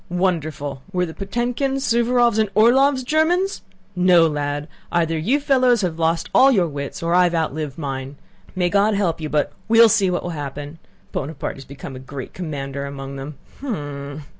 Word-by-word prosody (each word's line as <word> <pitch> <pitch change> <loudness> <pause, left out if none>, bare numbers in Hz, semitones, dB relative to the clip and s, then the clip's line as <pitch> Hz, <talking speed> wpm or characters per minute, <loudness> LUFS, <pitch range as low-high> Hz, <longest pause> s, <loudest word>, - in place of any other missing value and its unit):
"Wonderful!... 155 -6 -2
Were 180 -2 0
the 160 - -8
Potëmkins, 245 - -2
Suvórovs, 235 -1 +2
and 215 -2 +1
Orlóvs 260 +4 +4
Germans? 345 +7 +1 0.3
No, 180 -2 +5
lad, 145 -1 -2 0.2
either 165 -1 +1
you 215 - +1
fellows 255 -5 +3
have 170 -3 -2
all 160 - +3
lost 165 0 -1
your 255 -10 +5
wits, 140 +1 -6
or 170 +1 0
I 180 0 +5
have 175 -1 0
outlived 155 -3 -2
mine. 135 -2 -5 0.4
May 180 -1 +1
God 205 +1 +3
help 180 -5 0
you, 155 - -3
but 150 -1 0 0.2
we'll 230 0 +7
see 205 -4 +3
what 180 - -1
will 175 - -4
happen. 145 +1 -6 0.3
Buonaparte 145 0 -4
has 135 - -11
become 135 -1 -9
a - - -7
great 130 0 -8
commander 140 -5 -5
among 140 0 -7
them! 140 +2 -7 0.2
Hm!..." 145 - -5
170 Hz, 175 wpm, -21 LUFS, 145-225 Hz, 0.4 s, we'll